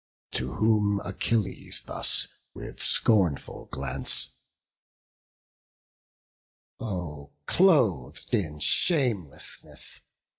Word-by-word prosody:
To 65 0 -2
whom 105 -2 +2
Achilles 115 -3 -2
thus - - +1 0.3
with - - -8
scornful 95 - +2
glance; 65 -1 -2 2.5
"Oh, 80 -10 -5
cloth'd 105 - +2
in 85 -10 0
shamelessness! 115 - +1
95 Hz, 65 wpm, -27 LUFS, 70-115 Hz, 2.5 s, whom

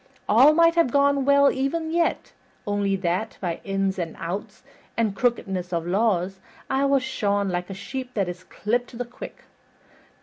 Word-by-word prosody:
All 260 +8 +6
might 335 0 +5
have 335 -5 +3
gone 280 +1 +3
well 280 0 +5
even 315 +5 -2
yet, 335 0 0 0.3
only 205 -1 0
that, 190 +3 -2
by 175 -3 -3
ins 195 -1 -1
and 165 -2 -4
outs 195 +5 -6 0.3
and 220 -4 +1
crookedness 195 -8 -1
of 170 -1 -1
laws, 190 -1 0 0.3
I 270 +1 +2
was 275 -1 +3
shorn 205 -6 0
like 180 0 -3
a 195 - -6
sheep 250 +5 -6
that 200 -4 0
is 180 +1 -6
clipped 240 +6 -2
to 235 - -11
the 245 - -3
quick. 240 +1 -10
215 Hz, 170 wpm, -24 LUFS, 190-265 Hz, 0.3 s, All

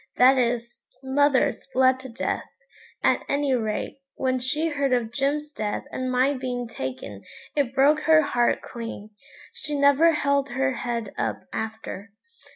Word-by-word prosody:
that 255 +2 +7
is, 240 -1 -1 0.2
mother's 275 -1 +2
bled 260 0 +4
to 260 0 -9
death, 230 - -3 0.5
at - - +3
any 280 -1 +1
rate; 220 +2 -2 0.2
when 255 -1 0
she 300 +6 0
heard 280 -3 0
of 235 -3 0
Jim's 290 +2 -1
death 210 -7 -3
and 255 0 -3
my 255 +3 +3
being 250 -2 -3
taken 130 - -6 0.3
it 275 -3 0
broke 285 +3 +5
her 315 0 +5
heart 240 -4 +1
clean; 230 -3 -7 0.4
she 300 -1 -3
never 285 +4 +5
held 280 -1 +1
her 265 +1 0
head 235 -4 -3
up - - -1
after. 220 -2 -5
260 Hz, 150 wpm, -25 LUFS, 235-280 Hz, 0.5 s, that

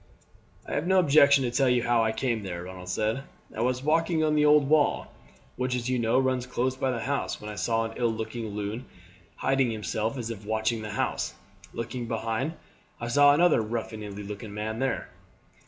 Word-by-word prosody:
"I - - -5
have 150 - -1
no 190 0 +4
objection 140 -4 +6
to 120 - -1
tell 135 +1 +3
you 125 -1 +2
how 120 -1 +3
I 110 - +1
came 115 -1 -1
there," 90 -3 -5
Ronald 90 0 -9
said. 110 +6 0 0.3
"I 110 - -2
was 125 +2 0
walking 165 +2 +2
on 155 -1 +2
the 150 0 +3
old 150 -1 +5
wall, 150 0 +2 0.5
which, 125 0 -1
as 125 +1 -2
you 125 - +1
know, 115 +1 +2
runs 130 -1 +1
close 125 +1 -1
by 130 0 -1
the 120 -3 -2
house, 140 +4 -2
when 105 0 -7
I - - -7
saw 115 +4 0
an 115 - -6
ill 120 -2 +1
looking 110 +1 -4
loon 105 +4 -4 0.5
hiding 135 -2 +1
himself 110 +2 -2
as 115 -2 -4
if 105 -2 -8
watching 110 +1 -1
the 105 - -6
house, 105 - -2 0.4
looking 120 +1 -5
behind 115 +6 -2 0.5
I 120 - -4
saw 145 +3 +6
another 170 -5 +4
ruffianly 105 -2 -5
looking 105 0 -7
man 110 +1 -3
there." 135 -2 -1
120 Hz, 200 wpm, -27 LUFS, 110-135 Hz, 0.5 s, objection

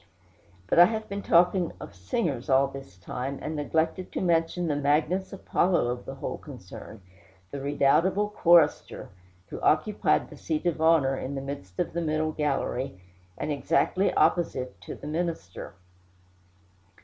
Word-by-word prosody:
But 130 - +2
I 175 - +11
have 220 +2 -3
been 200 0 -4
talking 175 0 +3
of - - -9
singers 130 - -3
all 135 +1 +5
this 135 -10 -11
time, 125 +9 -5
and 155 - -5
neglected 160 +4 -1
to - - -2
mention 170 0 +1
the 150 -3 0
Magnus 150 +6 +1
Apollo 180 -7 +1
of 125 0 -4
the 135 - -6
whole 135 - -5
concern, 110 - -11 0.5
the 140 - -5
redoubtable 145 +8 +2
chorister, 170 -6 +3 0.4
who - - -7
occupied - - +2
the - - -11
seat 160 +1 -3
of 170 -2 0
honor 160 -5 +4
in 135 +1 -5
the 135 - -3
midst 135 -10 -8
of - - -2
the 170 - -1
middle 155 -1 0
gallery, 135 -7 -2 0.4
and 155 - -3
exactly 180 +6 +1
opposite 130 -7 +1
to - - -7
the - - -12
minister. 155 - -4
150 Hz, 150 wpm, -27 LUFS, 135-170 Hz, 0.5 s, I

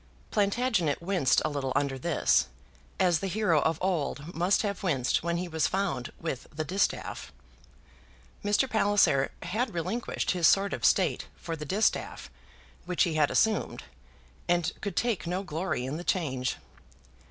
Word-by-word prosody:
Plantagenet 205 - +1
winced 170 -7 +2
a - - +1
little 140 -3 -3
under 135 -2 0
this, 130 - +2 0.5
as 180 -4 +3
the 195 - -3
hero 185 -6 +2
of 160 +1 +1
old 170 -3 -2
must 175 +6 +2
have 200 -2 -2
winced 135 -9 +1
when 170 +1 -1
he 180 +1 -3
was 160 -2 +1
found 175 -11 -2
with 160 -7 -4
the 155 +1 -3
distaff. 190 +6 -1 1.1
Mr. 205 +6 +2
Palliser 205 - +3
had 210 +5 -2
relinquished 185 +8 -2
his 175 -4 +3
sword 200 0 +3
of - - -5
state - - +2
for 165 - -5
the 150 -1 -7
distaff 200 +8 -1 0.5
which 180 0 +2
he 170 - 0
had 150 -2 +3
assumed, 220 -2 +1 0.6
and 175 -1 +1
could 200 -4 -4
take 220 -10 0
no 180 +3 -2
glory 155 -7 -2
in 135 +4 -3
the 175 - -6
change. 130 -9 -1
175 Hz, 155 wpm, -28 LUFS, 150-195 Hz, 1.1 s, as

